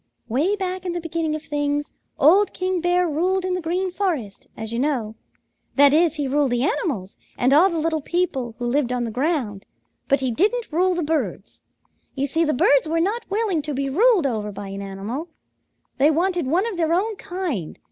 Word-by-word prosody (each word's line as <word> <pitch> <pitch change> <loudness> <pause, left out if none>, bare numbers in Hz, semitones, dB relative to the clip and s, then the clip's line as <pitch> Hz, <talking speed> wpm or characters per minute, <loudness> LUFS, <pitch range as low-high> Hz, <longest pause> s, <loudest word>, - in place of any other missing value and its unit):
"Way 295 - +1
back 375 -2 -3
in 355 -2 -3
the 350 - -2
beginning 330 -1 -2
of 310 - -6
things, 290 -1 -2 0.2
old 380 +8 +5
King 370 -1 -1
Bear 355 +1 +2
ruled 365 +5 0
in 370 - -1
the 365 - -2
Green 360 +3 -1
Forest, 325 - -3
as 220 +1 -5
you 235 - -1
know. 255 -6 -1 0.6
That 285 0 +7
is, 330 +1 +3
he 290 -3 -2
ruled 285 +1 +2
the 245 0 0
animals 270 - -2 0.2
and 255 +2 +3
all 340 +7 +6
the 340 - -3
little 320 0 0
people 285 -9 -1
who 245 - -4
lived 250 +1 +1
on 250 -1 -1
the 230 - -3
ground, 250 - -1 0.4
but 275 - +3
he 260 -2 -1
didn't 430 - 0
rule 365 +2 +2
the 345 - -1
birds. 315 +1 -3 0.5
You 275 0 0
see 320 +4 +1
the 305 - +1
birds 285 +2 +3
were 330 +1 0
not 425 +8 -1
willing 400 -5 0
to 295 -1 -4
be 275 0 -2
ruled 415 - +4
over 215 -5 -2
by 200 0 -7
an 195 0 -6
animal. 200 - -5 0.7
They 285 +3 +5
wanted 345 -1 +1
one 350 +9 +2
of 450 -6 -4
their 330 -1 +1
own 425 +4 0
kind. 345 - -4
310 Hz, 205 wpm, -22 LUFS, 265-360 Hz, 0.7 s, That